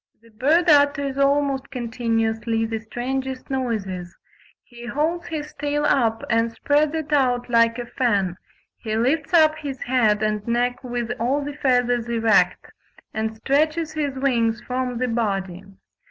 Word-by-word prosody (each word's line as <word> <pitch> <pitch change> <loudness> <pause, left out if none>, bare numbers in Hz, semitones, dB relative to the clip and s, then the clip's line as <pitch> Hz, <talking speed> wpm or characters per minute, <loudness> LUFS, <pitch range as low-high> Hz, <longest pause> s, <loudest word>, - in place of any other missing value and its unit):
The 230 - -19
bird 300 +11 +2
utters 285 -2 +3
almost 275 -1 +1
continuously 225 -2 -1
the 225 0 -3
strangest 260 +4 -4
noises: 195 -9 -3 0.5
"he 240 0 -12
holds 320 +7 -1
his 300 -2 -5
tail 295 0 -1
up 230 -6 +2
and 230 0 +1
spreads 290 +6 +1
it 315 -1 -3
out 245 -3 +1
like 230 0 +4
a 245 - -4
fan, 205 -8 0 0.4
he 220 -2 -3
lifts 280 +6 0
up 315 -3 +5
his 280 -4 -6
head 220 -4 +2
and 210 0 -1
neck 245 +2 0
with 240 -1 -3
all 270 +5 0
the 290 - -5
feathers 245 -4 +1
erect, 225 -1 +2 0.4
and 220 0 -3
stretches 305 +6 +1
his 290 -3 -2
wings 235 -4 +1
from 250 0 -3
the 255 +1 0
body. 195 -5 -2
245 Hz, 145 wpm, -23 LUFS, 225-285 Hz, 0.5 s, up